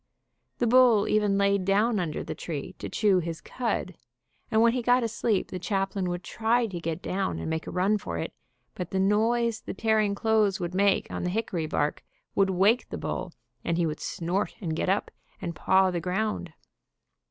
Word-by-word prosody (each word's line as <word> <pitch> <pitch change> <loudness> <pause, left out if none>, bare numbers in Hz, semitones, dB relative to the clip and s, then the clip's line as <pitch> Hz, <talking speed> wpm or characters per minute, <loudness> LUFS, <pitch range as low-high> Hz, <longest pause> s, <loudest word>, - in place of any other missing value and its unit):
The 245 - +1
bull 235 -3 +5
even 210 -2 +2
laid 200 -1 +2
down 205 +3 +2
under 165 -4 -2
the - - -5
tree 150 -5 -5
to - - -5
chew 205 -4 +3
his 165 -1 -4
cud, 225 -6 -3 0.6
and 220 - +2
when 230 +1 +5
he 250 - 0
got 245 +1 +3
asleep 225 -2 0
the 185 - -4
chaplain 195 0 -1
would 175 0 -4
try 230 +4 +1
to 190 -6 -5
get 165 0 -4
down 185 - -1
and 80 - -4
make 160 0 -3
a - - -4
run 195 +4 +2
for 85 - -5
it, 80 - -4 0.4
but 180 - -5
the 190 - -1
noise 225 +3 +2
the - - -6
tearing 215 -2 +2
clothes 215 -2 +2
would 175 -1 -3
make 200 +1 +3
on - - -3
the 180 - 0
hick 220 +4 -2
ory 165 -3 -1
bark 150 -1 -1 0.3
would 195 -1 +3
wake 195 +6 +3
the - - -4
bull, - - -4 0.3
and 170 - 0
he 175 - +2
would 155 -1 -3
snort, 180 +5 -2
and 165 -6 -3
get 170 - -1
up. 195 +2 0 0.3
and 170 -2 -4
paw 190 +2 +3
the 175 -1 -2
ground. 185 0 -2
195 Hz, 200 wpm, -27 LUFS, 180-220 Hz, 0.6 s, bull